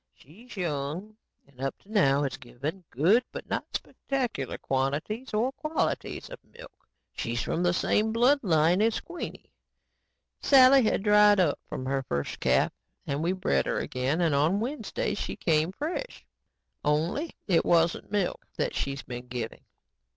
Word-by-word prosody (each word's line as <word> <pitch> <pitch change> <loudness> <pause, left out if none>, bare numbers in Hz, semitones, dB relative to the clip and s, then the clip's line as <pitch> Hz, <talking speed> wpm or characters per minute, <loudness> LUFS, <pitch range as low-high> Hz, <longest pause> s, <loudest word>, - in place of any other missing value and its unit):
She's 210 - -15
young 170 +5 -3 0.3
and 135 -2 -16
up 135 0 -2
to 205 - -17
now 145 -9 +3
has 135 - -2
given 145 +8 -6
good 185 - +3
but - - -7
not - - -2
spectacular 245 - -3
quantities 145 - -2
or 225 +5 +1
qualities 305 +3 -2
of - - -8
milk. - - -16 0.2
She's 115 0 -2
from 170 - -1
the 175 0 +3
same 210 +5 +1
blood 245 +6 +4
line 170 -1 +3
as 225 +1 +2
Queenie. 350 0 -8 0.9
Sally 270 0 +7
had 215 -3 +1
dried 210 -1 +6
up 165 -6 +2
from 130 - -5
her 135 +1 0
first 70 - -3
calf - - +2 0.3
and 140 +1 -2
we 170 +2 +1
bred 185 0 0
her - - 0
again 130 +7 -1
and 165 -3 +2
on 155 +8 +2
Wednesday 290 - -2
she - - -4
came 160 0 +1
fresh. 330 - -5 0.6
Only 165 - 0
it 175 -5 +3
isn't 170 +2 +2
milk 205 -4 -1
that - - -1
she's 140 0 -3
been 125 0 -7
giving. 120 -2 -5
175 Hz, 155 wpm, -28 LUFS, 140-225 Hz, 0.9 s, Sally